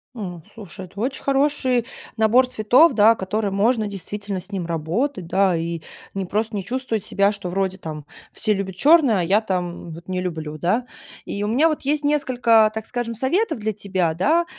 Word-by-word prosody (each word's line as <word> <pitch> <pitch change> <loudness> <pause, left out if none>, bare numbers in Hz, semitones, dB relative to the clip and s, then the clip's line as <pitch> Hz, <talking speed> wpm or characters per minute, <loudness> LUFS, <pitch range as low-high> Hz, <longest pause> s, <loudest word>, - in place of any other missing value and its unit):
Ну, 180 -7 -6
слушай, 195 -4 -8
это 200 +3 -12
очень 260 +4 -2
хороший 270 -3 +1 0.3
набор 225 +4 +4
цветов, 255 +6 +4
да, 220 +1 +6
который 205 +1 -2
можно, 215 +2 +1
действительно, 200 0 -5
с 190 +3 -10
ним 190 -3 -3
работать, 175 - -2
да, 190 0 +2
и 165 0 -3 0.3
не 195 -1 -3
просто 215 +4 -1
не 195 - -4
чувствовать 245 -4 -2
себя, 200 0 +2
что 200 -3 -5
вроде 190 0 -1
там 155 -5 -7 0.3
все 215 -1 +1
любят 195 -2 -4
черное, 280 - +5
а - - 0
я 195 +5 +3
там 180 -5 -4
вот 170 +3 -12
не 185 0 -1
люблю, 160 -4 -4
да. 195 +10 0 0.4
И 200 - -5
у - - -1
меня 270 +9 +3
вот 310 - -3
есть 295 +2 0
несколько, 245 -7 +3
так 220 0 -5
скажем, 240 -2 -3
советов 275 - 0
для 220 +1 -1
тебя, 185 -5 -1
да. 310 - +2
210 Hz, 190 wpm, -22 LUFS, 185-250 Hz, 0.4 s, да